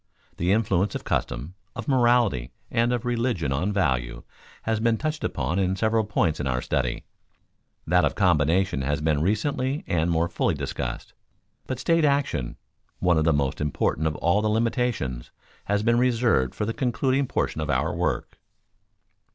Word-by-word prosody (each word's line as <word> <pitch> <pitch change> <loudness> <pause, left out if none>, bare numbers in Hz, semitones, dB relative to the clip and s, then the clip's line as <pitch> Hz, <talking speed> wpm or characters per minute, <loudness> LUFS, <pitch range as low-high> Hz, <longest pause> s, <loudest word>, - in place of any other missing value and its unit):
The 90 +2 +1
influence 100 -2 +1
of - - -4
custom, 70 +9 -2 0.2
of - - -6
morality, 120 - +3 0.2
and 115 +1 +2
of 125 -1 -1
religion 115 - 0
on 85 +9 0
value, 65 -11 -1 0.4
has 110 -1 0
been 115 0 +2
touched 155 +2 -3
upon 75 +7 -1
at 95 0 0
several 110 +1 +1
points 85 -6 0
in 70 - -2
our 60 -1 0
study; 65 -1 -1 0.8
that 90 +2 +3
of - - +1
combination 90 -3 +2
has 75 +2 -1
been 75 -1 +1
recently 130 - 0
and 85 0 0
more 85 0 +2
fully 85 - 0
discussed. - - -5 0.5
But 130 - -3
state 165 -1 +2
action, 140 - 0 0.4
one 90 -3 +2
of 80 - +1
the 80 - +4
most 70 -2 0
important 75 +1 0
of 75 - -2
all 85 +5 +2
the 110 - +1
limitations, 110 - -1 0.4
has 105 +1 0
been 120 +1 +3
reserved 120 - +2
for 105 - -2
the 115 - -2
concluding 130 +2 0
portion 80 - -1
of 75 - -3
our 65 -1 +1
work. - - -2
95 Hz, 165 wpm, -25 LUFS, 75-120 Hz, 0.8 s, the